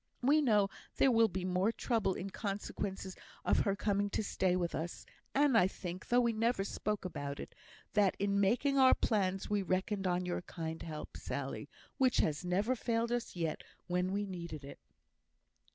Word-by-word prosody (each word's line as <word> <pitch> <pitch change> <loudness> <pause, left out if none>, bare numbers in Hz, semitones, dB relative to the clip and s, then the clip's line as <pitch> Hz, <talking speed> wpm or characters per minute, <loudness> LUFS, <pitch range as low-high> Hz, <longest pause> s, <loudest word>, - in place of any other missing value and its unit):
We 295 +4 +5
know 210 -7 +4 0.3
there 270 - +4
will 230 -1 +5
be 185 -2 -4
more 185 +4 +2
trouble 225 -5 0
in 195 +1 -5
consequence 195 -2 -4 0.3
of - - +3
her 200 -2 +1
coming 205 0 0
to 210 - -1
stay 185 -3 +1
with 175 -2 -1
us; 170 +2 -4 0.3
and 280 -2 +4
I 185 -5 +6
think, 185 -1 -7
though 245 +1 +4
we 235 -1 +2
never 225 -1 +1
spoke 210 0 -3
about 145 -5 -4
it, - - -7 0.4
that 205 -3 +3
in 200 0 +1
making 250 +8 +3
our 260 -1 +7
plans 195 -4 0
we 205 -1 +1
reckoned 190 +1 0
on 180 0 0
your 180 0 -2
kind 160 -2 -5
help, 155 -2 -7
Sally, - - -4 0.3
which 260 -2 +4
has 150 +1 +1
never 200 +8 +1
failed 230 0 0
us 240 -4 -2
yet 165 -3 -2 0.2
when 180 +1 0
we 205 +1 0
needed 170 -6 -6
it." 140 - -10
195 Hz, 180 wpm, -34 LUFS, 180-225 Hz, 0.4 s, our